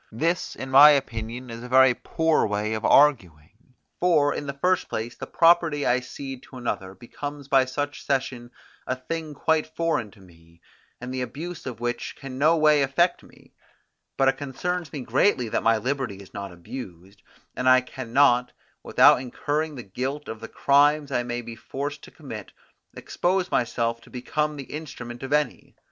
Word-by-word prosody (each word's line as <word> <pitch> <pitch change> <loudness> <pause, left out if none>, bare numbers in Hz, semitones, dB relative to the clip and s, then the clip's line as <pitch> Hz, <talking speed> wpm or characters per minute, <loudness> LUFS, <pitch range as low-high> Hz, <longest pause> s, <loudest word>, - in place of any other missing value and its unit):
This, 165 +10 -1
in 130 0 -7
my 140 +3 +10
opinion, 120 -3 -1
is 115 0 -7
a 125 - -9
very 130 0 +6
poor 160 +4 +1
way 105 +1 -1
of 110 0 -4
arguing; 115 - +2 0.2
for, 155 -5 +3
in 145 - -5
the 140 - -3
first 180 +7 0
place, 115 +2 -4
the - - -8
property 165 -3 +3
I 125 +1 +3
cede 130 +1 -8
to 130 - -10
another 95 -6 -4
becomes 145 +6 -8
by 135 -2 +4
such 145 +2 -4
cession 130 -3 -2 0.4
a 130 - 0
thing 155 +3 -6
quite 160 +2 +1
foreign 165 -10 0
to 100 - -20
me, 85 -2 -20 0.4
and 125 +1 -6
the 130 - -2
abuse 155 +5 -6
of 120 -4 -6
which 120 0 -3
can 135 -2 -8
no 160 +3 +4
way 150 -2 +4
affect 155 +6 +2
me; - - -20 0.6
but 135 - +3
it 135 - +2
concerns 160 +4 -4
me 145 - -5
greatly 125 - +1
that - - 0
my 115 0 +3
liberty 130 -1 -2
is 100 -1 -14
not 100 -1 -6
abused, 90 0 -10 0.3
and 125 0 +2
I 130 0 +6
can 125 -1 -9
not, 125 -2 +4 0.3
without - - +5
incurring 150 +4 -3
the 125 - -7
guilt 130 +9 -4
of 110 - -6
the - - -8
crimes 145 +1 +3
I 125 - +1
may 120 0 -4
be 115 0 -8
forced 145 +5 -5
to - - -13
commit, 115 - -9 0.4
expose 185 +1 -1
myself 115 -1 0
to - - -18
become 150 +4 -2
the 140 - -6
instrument 125 -6 -7
of 135 +1 -6
any. 150 0 -1
130 Hz, 180 wpm, -25 LUFS, 120-150 Hz, 0.6 s, my